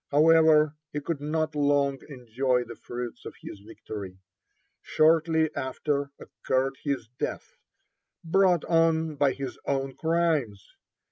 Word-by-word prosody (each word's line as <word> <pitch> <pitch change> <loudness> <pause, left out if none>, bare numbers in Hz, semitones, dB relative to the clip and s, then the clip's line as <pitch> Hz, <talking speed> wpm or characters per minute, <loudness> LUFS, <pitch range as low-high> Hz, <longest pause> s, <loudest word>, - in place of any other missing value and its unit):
However, 155 0 +5 0.2
he 150 - -3
could 145 0 -4
not 155 +1 -1
long 140 -2 +1
enjoy 125 -1 -1
the 120 0 -10
fruits 120 0 -7
of - - -9
his - - -9
victory. 100 -2 -9 0.6
Shortly 160 0 +2
after 140 +2 -2
occurred 135 +1 -2
his 140 -6 -2
death, - - -4 0.7
brought 180 0 +3
on 160 -1 +2
by 140 -1 +2
his 135 -1 -6
own 135 -1 -1
crimes. 160 - 0
145 Hz, 120 wpm, -27 LUFS, 130-160 Hz, 0.7 s, However